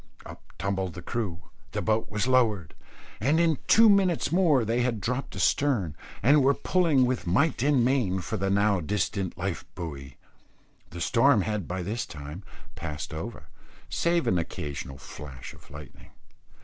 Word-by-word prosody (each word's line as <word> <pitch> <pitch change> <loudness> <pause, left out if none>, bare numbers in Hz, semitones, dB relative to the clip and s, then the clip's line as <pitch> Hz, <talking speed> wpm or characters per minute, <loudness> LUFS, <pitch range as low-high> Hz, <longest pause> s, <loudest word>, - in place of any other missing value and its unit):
Up - - -10 0.2
tumbled 95 -3 -2
the 90 - -8
crew, 100 -5 -3 0.3
the - - -1
boat 110 0 0
was 105 +1 -1
lowered, 115 - +2 0.5
and 145 - +2
in 165 -3 +2
two 225 +1 +7
minutes 195 -5 +3
more 165 -9 +3
they 115 +3 +1
had 120 -3 0
dropped 125 +6 -3
astern, 95 - +1 0.3
and 140 +4 +5
were 140 +1 +4
pulling 165 -8 +2
with 125 -6 -2
might 140 - +2
and 140 -4 +3
main 120 -8 +1
for 90 - -4
the 95 +1 -1
now 100 0 +3
distant 95 +2 -2
life 90 0 -3
buoy. 70 -6 -7 0.7
The 85 - -8
storm 115 - +4
had 105 -4 -3
by 90 0 -3
this 110 +5 -3
time 75 +4 -8 0.3
passed 75 -1 -6
over, 80 -2 -7 0.4
save 170 0 +1
an 90 - +2
occasional 70 -5 -5
flash 65 0 -10
of - - -18
lightning. 75 -2 -12
105 Hz, 160 wpm, -27 LUFS, 85-130 Hz, 0.7 s, two